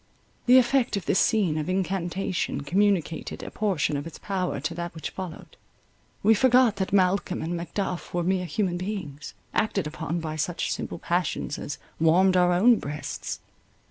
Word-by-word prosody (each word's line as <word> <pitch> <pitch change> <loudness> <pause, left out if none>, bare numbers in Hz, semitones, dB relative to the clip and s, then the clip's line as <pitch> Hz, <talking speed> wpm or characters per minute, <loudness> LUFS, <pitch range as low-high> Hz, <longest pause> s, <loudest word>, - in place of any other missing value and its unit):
The 250 +1 +8
effect 255 -3 +3
of 190 - -5
this 190 - +2
scene 190 -9 +2
of 155 - -3
incantation 185 -2 -1
communicated 175 +1 0
a - - -7
portion 190 -8 0
of 145 +3 -3
its 165 - -9
power 185 -6 -2
to 150 +4 -3
that 170 0 -5
which 160 - -5
followed. 185 -4 -8 0.7
We 220 +2 +6
forgot 250 -1 +4
that 190 -1 -2
Malcolm 190 -1 +2
and 170 +2 -2
Macduff 175 +2 -3
were 175 0 -1
mere 180 0 0
human 175 +1 -1
beings, 180 -7 -5 0.2
acted 200 -5 +1
upon 160 +2 -3
by 155 -1 -4
such 170 +3 -1
simple - - -4
passions 170 -3 -1
as 145 - -5 0.2
warmed 180 +4 +4
our 180 -1 +4
own 220 +7 +5
breasts. 145 +1 -5
180 Hz, 165 wpm, -26 LUFS, 165-200 Hz, 0.7 s, The